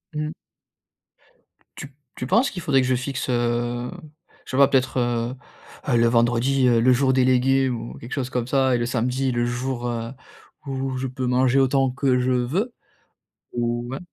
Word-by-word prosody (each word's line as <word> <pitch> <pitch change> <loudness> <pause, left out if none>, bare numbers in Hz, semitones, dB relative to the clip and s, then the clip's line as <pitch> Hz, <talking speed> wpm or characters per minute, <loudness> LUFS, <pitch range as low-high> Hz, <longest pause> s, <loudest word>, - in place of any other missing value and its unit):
Mmh. 150 0 -2 1.5
Tu 140 - -7 0.3
tu - - -5
penses 230 - +3
qu'il 180 - -7
faudrait 135 -3 +3
que 130 - -1
je 130 - +2
fixe, 130 +1 -4
heu, 120 0 -1 0.5
je - - -10
sais 130 - -2
pas 140 -1 +7
peut-être, 130 -1 +1
heu, 120 +1 -1 0.6
heu, - - +4
le 115 - +4
vendredi, 120 +3 +2
heu, 120 -1 +4
le 130 +2 +5
jour 130 +1 +3
délégué 130 +1 +3
ou 120 -2 -5
quelque 120 +4 -8
chose 130 -2 -2
comme 125 -1 -2
ça 130 -1 +2
et - - +2
le 120 - 0
samedi 125 +2 0
le 120 0 0
jour, 120 0 -3
heu, 115 0 -3 0.5
où 135 -1 -3
je 130 - -3
peux 130 0 -4
manger 130 +1 +3
autant 135 0 +2
que 130 -1 +1
je 125 +1 0
veux 155 - -1 0.8
ou 120 0 -2
ouais? 135 - -4
125 Hz, 185 wpm, -23 LUFS, 120-135 Hz, 1.5 s, pas